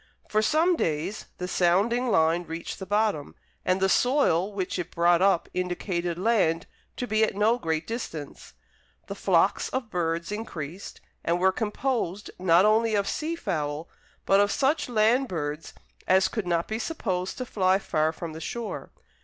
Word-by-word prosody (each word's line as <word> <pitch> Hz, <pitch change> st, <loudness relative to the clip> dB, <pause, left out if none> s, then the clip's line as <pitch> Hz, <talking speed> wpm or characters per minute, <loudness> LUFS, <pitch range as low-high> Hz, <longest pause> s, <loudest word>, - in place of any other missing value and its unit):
For 215 Hz, -, +2 dB
some 320 Hz, +10 st, +3 dB
days 165 Hz, -, -2 dB
the 180 Hz, -, -4 dB
sounding 200 Hz, +8 st, +2 dB
line 165 Hz, -3 st, +3 dB
reached 165 Hz, +1 st, -6 dB
the 190 Hz, -, -7 dB
bottom, 205 Hz, -7 st, 0 dB, 0.3 s
and 185 Hz, +1 st, +1 dB
the 190 Hz, -, +3 dB
soil 210 Hz, -, +2 dB
which 190 Hz, -2 st, -3 dB
it 175 Hz, -, -4 dB
brought 170 Hz, +1 st, +3 dB
up 195 Hz, -3 st, +3 dB
indicated 180 Hz, -1 st, -2 dB
land 185 Hz, -5 st, +2 dB, 0.3 s
to 250 Hz, -, -2 dB
be 215 Hz, -2 st, +2 dB
at 215 Hz, -, +1 dB
no 220 Hz, +4 st, +2 dB
great 160 Hz, -3 st, -1 dB
distance. 165 Hz, -, -6 dB, 0.5 s
The -, -, -6 dB
flocks -, -, +2 dB
of 255 Hz, -4 st, -4 dB
birds 170 Hz, 0 st, -1 dB
increased, 185 Hz, -5 st, -6 dB, 0.2 s
and 170 Hz, +1 st, +1 dB
were 190 Hz, +1 st, +4 dB
composed 210 Hz, -2 st, -2 dB
not 180 Hz, +1 st, +5 dB
only 220 Hz, +1 st, +3 dB
of 200 Hz, -1 st, +1 dB
sea 315 Hz, +10 st, -2 dB
fowl, 155 Hz, -, -3 dB, 0.4 s
but 195 Hz, -, +4 dB
of 205 Hz, 0 st, +3 dB
such 275 Hz, +1 st, +1 dB
land 240 Hz, +4 st, +3 dB
birds 155 Hz, -4 st, -4 dB, 0.4 s
as 190 Hz, +1 st, +4 dB
could 215 Hz, -6 st, -4 dB
not 170 Hz, -1 st, 0 dB
be 220 Hz, +1 st, -3 dB
supposed 190 Hz, -, -3 dB
to 255 Hz, -, -3 dB
fly 190 Hz, -5 st, +2 dB
far 155 Hz, -5 st, 0 dB
from 165 Hz, 0 st, -7 dB
the 160 Hz, -, -8 dB
shore. 230 Hz, +8 st, -5 dB
190 Hz, 165 wpm, -26 LUFS, 170-220 Hz, 0.5 s, not